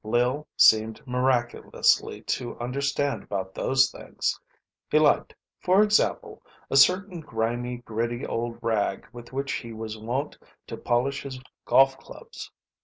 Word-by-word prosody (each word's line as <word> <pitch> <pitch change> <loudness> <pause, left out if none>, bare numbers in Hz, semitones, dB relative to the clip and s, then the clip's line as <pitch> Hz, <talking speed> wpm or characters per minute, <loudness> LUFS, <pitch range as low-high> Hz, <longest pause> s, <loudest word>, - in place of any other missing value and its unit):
Lil 125 +7 0
seemed 110 0 +4
miraculously 125 -1 +1
to 120 -2 -3
understand 140 +3 -1
about 95 -2 -5
those 130 0 +2
things. - - -3 0.5
He - - +3
liked, 155 -1 +3 0.2
for 190 +3 +4
example, 210 0 0 0.3
a - - 0
certain 180 +6 +4
grimy, 120 -2 -3
gritty 120 +1 -3
old 115 0 -3
rag 110 -4 -1
with 120 -1 -11
which 135 +1 -3
he 115 -3 -5
was 110 0 -6
wont 125 +7 -3 0.3
to - - -7
polish 125 +4 -1
his 135 -2 -7 0.3
golf 135 0 +4
clubs. - - -11
125 Hz, 130 wpm, -26 LUFS, 115-140 Hz, 0.5 s, seemed